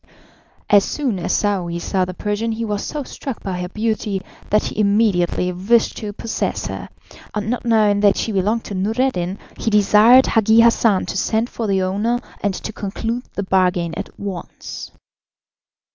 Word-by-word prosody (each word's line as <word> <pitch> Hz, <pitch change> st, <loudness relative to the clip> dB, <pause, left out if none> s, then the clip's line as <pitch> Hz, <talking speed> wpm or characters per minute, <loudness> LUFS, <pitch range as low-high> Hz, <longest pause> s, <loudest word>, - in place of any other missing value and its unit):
As 205 Hz, -1 st, +6 dB
soon 255 Hz, -8 st, -2 dB
as -, -, -2 dB
Saouy 185 Hz, -5 st, 0 dB
saw 185 Hz, +2 st, 0 dB
the 185 Hz, 0 st, -7 dB
Persian 210 Hz, +3 st, -2 dB
he 230 Hz, +1 st, -3 dB
was 205 Hz, -2 st, -2 dB
so 295 Hz, -1 st, -4 dB
struck 265 Hz, -1 st, -7 dB
by 185 Hz, -2 st, -3 dB
her 180 Hz, -, -4 dB
beauty, 215 Hz, -1 st, -1 dB, 0.3 s
that 210 Hz, +1 st, +3 dB
he -, -, -4 dB
immediately 200 Hz, -4 st, +2 dB
wished 205 Hz, +6 st, +2 dB
to 210 Hz, -2 st, -5 dB
possess 220 Hz, +2 st, -3 dB
her, -, -, -6 dB, 0.5 s
and 210 Hz, +1 st, -1 dB
not 245 Hz, -, -3 dB
knowing 215 Hz, -3 st, +3 dB
that 205 Hz, -1 st, +4 dB
she 225 Hz, -, -1 dB
belonged 210 Hz, +4 st, 0 dB
to -, -, -7 dB
Noureddin, 200 Hz, -2 st, -1 dB, 0.2 s
he -, -, 0 dB
desired 210 Hz, +5 st, +6 dB
Hagi 225 Hz, 0 st, +4 dB
Hassan 230 Hz, -4 st, +3 dB
to -, -, -5 dB
send 220 Hz, +4 st, 0 dB
for 225 Hz, -, -3 dB
the 190 Hz, -1 st, +1 dB
owner 205 Hz, +6 st, 0 dB, 0.2 s
and 200 Hz, -2 st, 0 dB
to 220 Hz, -, -6 dB
conclude 225 Hz, +5 st, -4 dB
the 200 Hz, -, -2 dB
bargain 180 Hz, -3 st, +1 dB
at -, -, -7 dB
once. 195 Hz, -4 st, -7 dB
210 Hz, 170 wpm, -20 LUFS, 190-225 Hz, 0.5 s, As